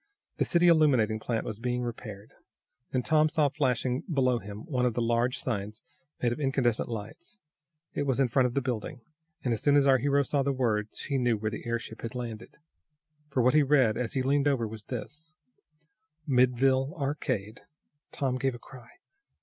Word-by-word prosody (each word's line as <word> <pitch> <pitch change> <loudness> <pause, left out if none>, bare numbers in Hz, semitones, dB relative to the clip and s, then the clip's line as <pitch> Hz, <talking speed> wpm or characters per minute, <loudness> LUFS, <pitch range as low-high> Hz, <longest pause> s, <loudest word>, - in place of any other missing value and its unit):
The - - +1
city 175 -1 +3
illuminating 130 -10 +4
plant 115 0 -2
was 110 - -5
being 125 +1 -1
repaired. 110 -3 -7 0.6
Then 130 -1 0
Tom 155 +2 +3
saw 150 -2 +2
flashing 130 -3 0
below 130 -4 +2
him 105 0 -9
one 130 -7 -1
of 125 -3 +1
those 120 - 0
large 120 +2 +1
signs 105 -3 -4 0.4
made 120 - +3
of 120 - -3
incandescent 135 -6 0
lights. 115 - -7 0.6
It 145 - -2
was 135 -1 +1
in 135 - +4
front 125 +2 +3
of 125 - -6
the 140 - +1
building, 125 +2 -4 0.4
and 125 - +1
as 110 - -3
soon 145 -1 +4
as 140 -1 +5
our 135 -2 +5
hero 140 +2 +2
saw 140 +1 0
the 140 +1 +1
words 110 -5 -1
he 140 -2 -1
knew 120 -3 +2
where 110 +1 -2
the 115 - -7
airship 115 -1 -4
had 115 +1 -6
landed. 120 -2 -6 0.7
For 130 -3 +1
what 125 - +4
he 155 - +6
read, 135 -6 +3
as 120 -3 -2
he 130 - 0
leaned 140 +2 +2
over, 130 -5 +1
was 110 -1 -9
this: 150 +7 -7 0.9
MIDDLEVILLE 130 +1 +2
ARCADE 135 -7 -3 0.5
Tom 130 -3 -1
gave 135 -2 0
a - - -7
cry. 120 -1 -14
125 Hz, 190 wpm, -28 LUFS, 115-140 Hz, 0.9 s, he